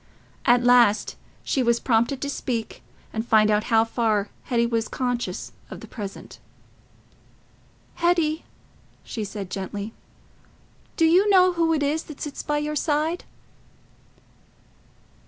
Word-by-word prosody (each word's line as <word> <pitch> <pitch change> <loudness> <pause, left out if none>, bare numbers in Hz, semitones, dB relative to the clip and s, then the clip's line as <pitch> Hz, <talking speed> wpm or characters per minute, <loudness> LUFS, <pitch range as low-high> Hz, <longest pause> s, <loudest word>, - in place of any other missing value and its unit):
At 245 0 +5
last 240 -4 +4 0.3
she 270 - 0
was 235 -1 +2
prompted 240 +3 +1
to 285 - -2
speak 235 -5 -4 0.3
and 220 - -2
find 215 -2 +4
out 210 +1 +1
how 225 -1 +3
far 220 -3 0 0.2
Hetty 235 -2 +1
was 230 -1 -1
conscious 245 -2 -3 0.2
of - - -8
the - - -11
present. 205 -4 -8 1.6
"Hetty," 335 -2 +1 0.6
she 220 - -5
said 200 -2 -6
gently, 200 +3 -5 1.0
"do 330 - +4
you 365 +6 +4
know 370 -2 +5
who 335 -1 +1
it 305 -2 +1
is 300 +3 0
that 300 - -11
sits 295 -2 -5
by 295 0 -1
your 300 +1 -2
side?" 310 +3 0
245 Hz, 130 wpm, -24 LUFS, 225-305 Hz, 1.6 s, At